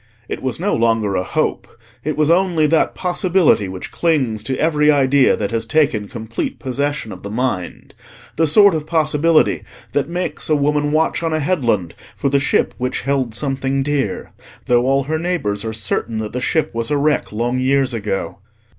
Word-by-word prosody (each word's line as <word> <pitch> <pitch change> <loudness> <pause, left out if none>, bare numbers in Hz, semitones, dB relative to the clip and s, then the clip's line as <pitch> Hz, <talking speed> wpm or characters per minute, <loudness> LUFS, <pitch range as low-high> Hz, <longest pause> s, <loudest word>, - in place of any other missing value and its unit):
It - - -5
was 130 +2 -3
no 200 +4 0
longer 115 -3 +1
a 90 - +1
hope; 90 - -2 0.4
it 155 +1 -2
was 155 +1 +3
only 175 -3 +3
that 160 +1 +2
possibility 180 - +2
which 95 0 -7
clings 135 -10 0
to 130 0 -2
every 150 -2 +2
idea 140 -1 +3
that 100 -2 -2
has 115 0 -1
taken 140 -8 +1
complete 115 -1 -5
possession 140 -2 -3
of 90 - -9
the 100 - -7
mind: 110 -5 -3 0.4
the 160 0 +2
sort 200 +5 +6
of 155 -1 -3
possibility 155 0 +2 0.3
that 145 +2 -1
makes 175 -4 -3
a 155 - +4
woman 145 0 +1
watch 160 +2 +1
on 165 -1 -1
a 155 - +1
headland 120 - 0 0.2
for 140 - 0
the 140 +1 +2
ship 135 - +1
which 125 +1 -2
held 130 -4 -1
something 135 0 -1
dear, 140 -8 -2 0.3
though 120 +1 +2
all 135 +1 +2
her 155 +3 -2
neighbours 160 - -2
are 110 - -3
certain 110 +1 -2
that 110 -1 -4
the 125 - -3
ship 160 +4 0
was 115 0 -1
a 145 - +1
wreck 145 +1 0
long 120 +4 -1
years 135 0 +1
ago. 105 -3 -3
140 Hz, 185 wpm, -19 LUFS, 115-155 Hz, 0.4 s, sort